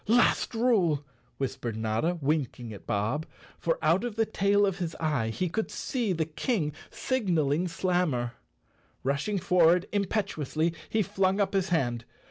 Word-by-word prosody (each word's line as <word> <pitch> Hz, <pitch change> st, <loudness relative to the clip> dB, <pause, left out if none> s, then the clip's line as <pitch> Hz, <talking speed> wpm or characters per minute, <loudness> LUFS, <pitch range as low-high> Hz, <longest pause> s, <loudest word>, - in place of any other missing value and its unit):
"Last 240 Hz, +1 st, +3 dB
rule," 190 Hz, -, +2 dB, 0.3 s
whispered 120 Hz, -4 st, -3 dB
Notta, 110 Hz, +11 st, 0 dB
winking 135 Hz, -6 st, -1 dB
at 100 Hz, -, -12 dB
Bob—for 150 Hz, +9 st, -2 dB
out 165 Hz, +7 st, +3 dB
of 240 Hz, -3 st, -3 dB
the 225 Hz, 0 st, +2 dB
tail 205 Hz, -1 st, +3 dB
of 195 Hz, -1 st, -1 dB
his 170 Hz, -3 st, -3 dB
eye, 145 Hz, -9 st, 0 dB
he 180 Hz, +11 st, -1 dB
could 220 Hz, +6 st, -2 dB
see 240 Hz, -6 st, -2 dB
the 165 Hz, -3 st, 0 dB
King 160 Hz, -, -1 dB, 0.2 s
signal¬ 175 Hz, -, 0 dB
ing 175 Hz, +5 st, 0 dB
Slammer. 170 Hz, -9 st, 0 dB, 0.7 s
Rushing 140 Hz, +10 st, 0 dB
forward 180 Hz, 0 st, +4 dB
impetuously 180 Hz, -6 st, 0 dB, 0.2 s
he 220 Hz, -1 st, +2 dB
flung 190 Hz, +2 st, +1 dB
up 200 Hz, -, +1 dB
his 190 Hz, -1 st, +1 dB
hand. 120 Hz, -9 st, 0 dB
170 Hz, 145 wpm, -28 LUFS, 145-200 Hz, 0.7 s, forward